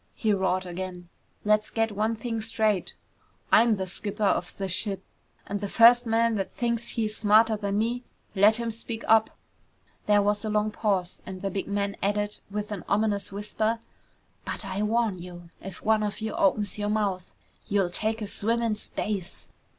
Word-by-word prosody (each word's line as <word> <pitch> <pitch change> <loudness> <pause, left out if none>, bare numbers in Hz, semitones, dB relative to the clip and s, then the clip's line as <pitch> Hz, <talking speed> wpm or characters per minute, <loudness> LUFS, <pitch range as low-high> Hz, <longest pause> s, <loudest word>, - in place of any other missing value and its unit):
he 215 -2 +1
roared 185 -1 0
again. 180 0 -6 0.4
"Let's 215 0 +3
get 225 -1 0
one 215 +2 0
thing 225 0 -3
straight! 220 -3 0 0.6
I'm 230 -1 +6
the 190 -1 -3
skipper 205 +3 -3
of 180 -3 +1
this 195 -2 -3
ship 195 +1 -2 0.4
and 205 0 -3
the 205 - -3
first 240 +2 +6
man 230 +1 +3
that 195 - -4
thinks 235 -1 -1
he's 215 -2 -1
smarter 220 +1 +4
than 200 -1 -2
me, 235 +3 0 0.3
let 205 +3 +6
him 235 0 -2
speak 225 0 -5
up!" 220 0 +4 0.7
There 205 -1 +5
was 205 +1 +1
a 215 - -2
long 210 0 +1
pause 195 -4 -1
and 190 0 -8
the 195 - -1
big 195 - -3
man 200 0 -1
added 205 +1 -1
with 210 +1 -4
an 200 -4 -4
ominous 200 -1 +1
whisper, 215 +3 -1 0.7
"But - - -5
I 200 - -3
warn 215 -3 +1
you, 175 -1 -10
if 195 - -9
one 220 0 +3
of 210 -1 -2
you 220 -1 -3
opens 205 +2 +1
your 205 0 -1
mouth, 200 -4 -1 0.4
you'll 195 -3 +1
take 220 +4 0
a - - -4
swim 230 +4 0
in 230 -2 +1
space!" 190 - -4
210 Hz, 180 wpm, -27 LUFS, 195-220 Hz, 0.7 s, I'm